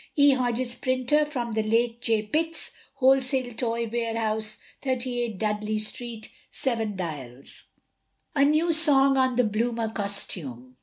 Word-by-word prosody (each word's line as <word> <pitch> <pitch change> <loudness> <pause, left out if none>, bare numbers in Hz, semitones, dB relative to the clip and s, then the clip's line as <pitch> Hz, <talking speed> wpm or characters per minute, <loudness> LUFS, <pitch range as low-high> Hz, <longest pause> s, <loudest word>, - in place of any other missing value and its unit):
E. 285 -1 +6
Hodges, 245 -1 0
Printer 255 +4 +1
(from 245 -6 -4
the 220 0 0
late 230 +2 0
J. 225 -3 +1
Pitt's), 325 +9 0 0.2
Wholesale 265 -2 +2
Toy 230 0 -2
Warehouse, 220 -2 -1 0.2
38, 245 -4 -2
Dudley 215 +1 -1
Street, 220 +1 -4 0.2
7 225 -5 -2
Dials. 140 -8 -6 0.7
A 280 -3 +3
NEW 310 +4 +3
SONG 275 -4 +6
ON 260 -1 +2
THE 250 - +3
BLOOMER 225 +1 -1
COSTUME. 170 - -3
235 Hz, 125 wpm, -26 LUFS, 215-260 Hz, 0.7 s, E